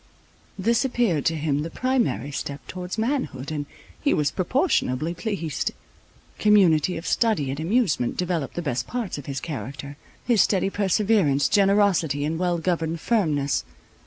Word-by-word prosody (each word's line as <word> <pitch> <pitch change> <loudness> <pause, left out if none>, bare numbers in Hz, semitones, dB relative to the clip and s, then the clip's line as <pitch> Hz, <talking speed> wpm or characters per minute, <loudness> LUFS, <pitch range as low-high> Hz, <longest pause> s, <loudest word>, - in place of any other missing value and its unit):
This 230 +6 +2
appeared 235 - +1
to 165 - +2
him 150 -2 0
the 160 - -4
primary 255 - 0
step 140 0 -5
towards 180 +2 -6
manhood, 220 - -2
and 145 -2 -3 0.3
he 290 - +2
was 150 -1 +1
proportionably 170 - 0
pleased. 180 - -3 0.7
Community 185 -6 +4
of 165 - -7
study 210 - +1
and 140 - -5
amusement 170 - +1
developed 175 -5 -2
the 175 - -3
best 125 -4 -2
parts 235 -10 -3
of 140 - -11
his 135 -1 -3
character, 140 0 -6 0.3
his 235 -6 +4
steady 195 0 +2
perseverance, 195 -8 +2
generosity, 195 -8 +3
and 160 +2 -2
well 175 -1 +1
governed 165 -1 -1
firmness. 155 -12 +1
170 Hz, 145 wpm, -24 LUFS, 145-210 Hz, 0.7 s, Community